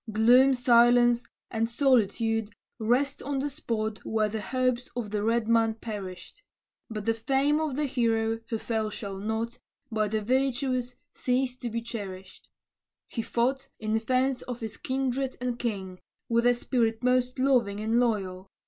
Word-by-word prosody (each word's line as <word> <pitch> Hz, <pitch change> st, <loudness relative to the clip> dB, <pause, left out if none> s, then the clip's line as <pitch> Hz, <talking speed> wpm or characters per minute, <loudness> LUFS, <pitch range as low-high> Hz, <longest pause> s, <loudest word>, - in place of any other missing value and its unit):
Gloom, 245 Hz, +5 st, +6 dB
silence, 240 Hz, -1 st, +5 dB, 0.3 s
and 225 Hz, 0 st, 0 dB
solitude 225 Hz, -4 st, +2 dB, 0.3 s
rest 250 Hz, +6 st, +1 dB
on 280 Hz, 0 st, -2 dB
the 285 Hz, +2 st, -1 dB
spot 220 Hz, -6 st, -3 dB
Where 215 Hz, -1 st, 0 dB
the 220 Hz, +1 st, -3 dB
hopes 255 Hz, +2 st, -1 dB
of 230 Hz, -4 st, -4 dB
the 210 Hz, -1 st, -1 dB
red 225 Hz, +1 st, +1 dB
man 225 Hz, -1 st, +3 dB
perished; 210 Hz, -, -7 dB, 0.5 s
But 215 Hz, -2 st, -5 dB
the 225 Hz, -, +3 dB
fame 275 Hz, +6 st, +1 dB
of 310 Hz, -4 st, -1 dB
the 300 Hz, +1 st, 0 dB
hero 225 Hz, -4 st, +1 dB
who 225 Hz, -, -1 dB
fell 220 Hz, -1 st, -2 dB
shall 200 Hz, -2 st, -6 dB
not, 220 Hz, +3 st, -3 dB, 0.3 s
By 215 Hz, -1 st, +1 dB
the 215 Hz, +1 st, -1 dB
virtuous, 255 Hz, 0 st, 0 dB, 0.2 s
cease 250 Hz, 0 st, 0 dB
to 245 Hz, -2 st, -4 dB
be 230 Hz, +1 st, -3 dB
cherished. 195 Hz, -5 st, -8 dB, 0.6 s
He 230 Hz, -, -3 dB
fought, 260 Hz, +4 st, 0 dB
in 215 Hz, 0 st, -2 dB
defence 255 Hz, +3 st, +1 dB
of 245 Hz, -1 st, -6 dB
his 220 Hz, -1 st, -5 dB
kindred 265 Hz, 0 st, -2 dB
and 245 Hz, -1 st, -3 dB
king, 190 Hz, -6 st, -3 dB, 0.3 s
With 235 Hz, +1 st, +3 dB
a 245 Hz, -, +5 dB
spirit 235 Hz, -2 st, 0 dB
most 250 Hz, 0 st, +2 dB
loving 250 Hz, -7 st, +2 dB
and 220 Hz, +2 st, +1 dB
loyal. 195 Hz, -6 st, -1 dB
235 Hz, 155 wpm, -28 LUFS, 220-255 Hz, 0.6 s, Gloom